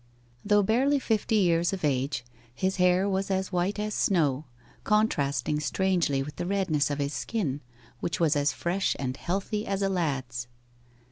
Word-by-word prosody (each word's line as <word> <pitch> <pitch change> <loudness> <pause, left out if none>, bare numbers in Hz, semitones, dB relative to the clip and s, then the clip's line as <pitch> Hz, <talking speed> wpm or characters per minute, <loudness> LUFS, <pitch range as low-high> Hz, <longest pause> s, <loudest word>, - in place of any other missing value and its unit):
Though 205 0 +4
barely 260 +8 +3
fifty 220 -4 0
years 175 -3 +3
of 185 -5 -2
age, 135 -2 -1 0.3
his 190 +4 -1
hair 180 +1 +3
was 195 0 -1
as 190 0 -1
white 180 +3 0
as 210 0 -2
snow, 155 -9 +1 0.4
contrasting 150 - +1
strangely 170 -4 +1
with 150 +2 -9
the 175 - -3
redness 180 -8 +1
of 145 - -2
his 140 0 -2
skin, 145 - -2 0.4
which 155 -4 -2
was 160 -3 +3
as 145 0 +2
fresh 185 +3 -1
and 130 -2 -3
healthy 200 +7 -2
as 195 0 -1
a 195 - +2
lad's. 135 -9 -2
175 Hz, 160 wpm, -27 LUFS, 145-195 Hz, 0.4 s, Though